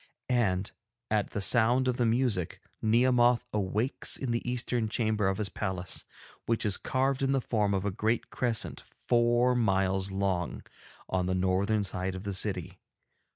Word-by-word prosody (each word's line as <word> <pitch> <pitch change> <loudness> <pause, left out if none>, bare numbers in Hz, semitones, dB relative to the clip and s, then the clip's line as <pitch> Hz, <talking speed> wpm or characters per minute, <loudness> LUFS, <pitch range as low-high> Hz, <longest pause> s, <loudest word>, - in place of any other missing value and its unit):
And, 100 -6 +1 0.4
at 105 -2 +1
the 105 - -4
sound 120 +5 +4
of 125 -1 0
the 120 - +2
music, 115 -7 0 0.2
Nehemoth 120 +2 +3
awakes 105 +5 0
in 130 -3 -3
the 115 - 0
eastern 120 -2 -1
chamber 110 -3 0
of 95 - 0
his 105 -2 -2
palace, 95 -3 -3 0.4
which 115 0 0
is 105 - +3
carved 135 +1 0
in 135 0 +2
the 135 - +2
form 105 -5 0
of 95 +1 -2
a 100 - 0
great 110 +5 -1
crescent, 120 -3 -1
four 120 +1 +1
miles 95 -4 +1
long, 95 -3 -2 0.4
on 90 -1 -1
the 95 - 0
northern 95 +3 +1
side 95 -1 -3
of 95 - -7
the 100 -1 -3
city. 95 -2 -2
110 Hz, 160 wpm, -29 LUFS, 95-120 Hz, 0.4 s, sound